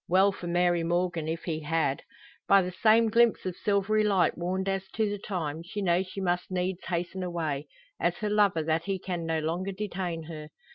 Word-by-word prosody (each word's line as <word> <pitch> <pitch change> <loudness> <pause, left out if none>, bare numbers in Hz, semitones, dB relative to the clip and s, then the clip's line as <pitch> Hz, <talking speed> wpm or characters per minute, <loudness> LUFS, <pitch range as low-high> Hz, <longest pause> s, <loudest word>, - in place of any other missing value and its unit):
Well 190 +3 +5
for 180 -2 -7
Mary 175 0 +2
Morgan 175 -1 0
if 165 +1 -3
he 160 -3 -2
had. 155 -3 0 0.5
By 195 -1 +6
the 180 - -3
same 220 +4 +4
glimpse 235 -2 +4
of 185 -2 -2
silvery 210 +1 +1
light 195 -4 +3
warned 185 +2 -2
as 195 0 -1
to 220 -1 +2
the 205 0 -3
time, 165 -6 -3
she 175 +5 -6
knows 180 -1 +1
she 190 - -7
must 180 -2 -1
needs 185 0 -2
hasten 175 +1 -2
away; 160 -5 -2 0.3
as - - +1
her 215 -3 -2
lover, 200 -6 +3
that 160 +1 0
he 195 -1 -1
can 175 -3 -4
no 165 0 +1
longer 170 +5 -2
detain 185 -4 -4
her. 155 -1 -8
180 Hz, 200 wpm, -28 LUFS, 165-195 Hz, 0.5 s, By